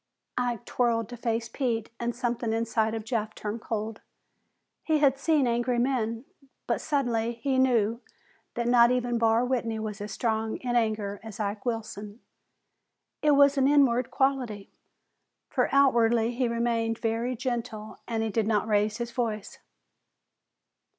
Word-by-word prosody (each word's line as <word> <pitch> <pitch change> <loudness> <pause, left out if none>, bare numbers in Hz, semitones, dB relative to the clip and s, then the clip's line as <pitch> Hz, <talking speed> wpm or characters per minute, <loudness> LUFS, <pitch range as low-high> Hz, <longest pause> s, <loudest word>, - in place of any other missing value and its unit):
Ike 245 -3 -2
whirled 230 -2 +2
to 245 - -7
face 230 -1 -2
Pete 230 -3 -2
and 235 -1 -2
something 240 -2 -1
inside 225 -1 0
of 220 -1 -5
Jeff 220 -2 -2
turned 215 +2 -5
cold. 220 -1 -4 0.8
He 315 -1 +2
had 275 -2 +3
seen 300 -2 +2
angry 240 +1 +1
men, 240 -2 0 0.4
but - - -1
suddenly 240 -6 0
he 260 +3 -1
knew 235 -3 +2 0.5
that 235 0 -1
not 240 -1 +6
even 245 -1 0
Barr 230 +1 +3
Whitney 235 -3 -1
was 215 -1 -5
as 210 - -5
strong 220 -1 -1
in 245 -1 -3
anger 215 -3 0
as 220 0 -10
Ike 205 +2 -3
Wilson. 215 -2 -4 1.0
It 300 -1 +4
was 280 0 +5
an 265 - +4
inward 265 -4 +3
quality, 255 -7 -1 0.8
for - - +1
outwardly 235 -4 +4
he 250 +1 0
remained 230 -1 0
very 230 +2 -1
gentle 230 -3 -4
and 225 -2 -1
he 225 - -1
did 220 0 0
not 215 -1 +1
raise 210 0 +1
his 235 0 -4
voice. 225 -4 -3
235 Hz, 150 wpm, -27 LUFS, 220-245 Hz, 1.0 s, not